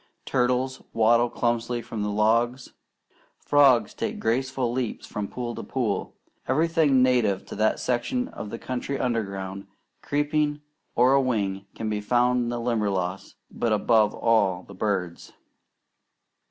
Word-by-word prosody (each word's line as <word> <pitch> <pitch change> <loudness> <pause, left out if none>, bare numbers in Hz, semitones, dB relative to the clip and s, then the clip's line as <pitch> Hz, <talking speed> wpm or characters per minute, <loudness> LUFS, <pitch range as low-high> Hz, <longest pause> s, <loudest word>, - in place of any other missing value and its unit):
Turtles 130 +1 0
waddle 115 +2 +4
clumsily 120 0 -1
from 115 -2 -5
the 105 - -1
logs. 115 +4 +1 0.6
Frogs 140 -4 +4
take - - -4
graceful 130 +1 0
leaps 125 -2 -3
from 105 -1 -4
pool 120 +1 -5
to - - -6
pool. 115 -7 -2 0.3
Everything 150 -2 +3
native 120 -7 +2
to - - -8
that 110 +1 +2
section 130 - -1
of 105 - -7
the 115 - -5
country 130 +3 -4
underground, 100 -6 -3 0.3
creeping, 145 0 0 0.3
or 125 +3 +5
a 140 - +5
wing 100 -6 -1
can 110 - -4
be 105 -1 -1
found 125 +3 +2
in - - -2
the 120 0 -3
Limberlost; 100 -6 -2 0.2
but 115 - -1
above 110 0 +3
all 100 -6 +2
the 100 - -13
birds. 95 -3 -3
120 Hz, 140 wpm, -25 LUFS, 105-130 Hz, 0.6 s, or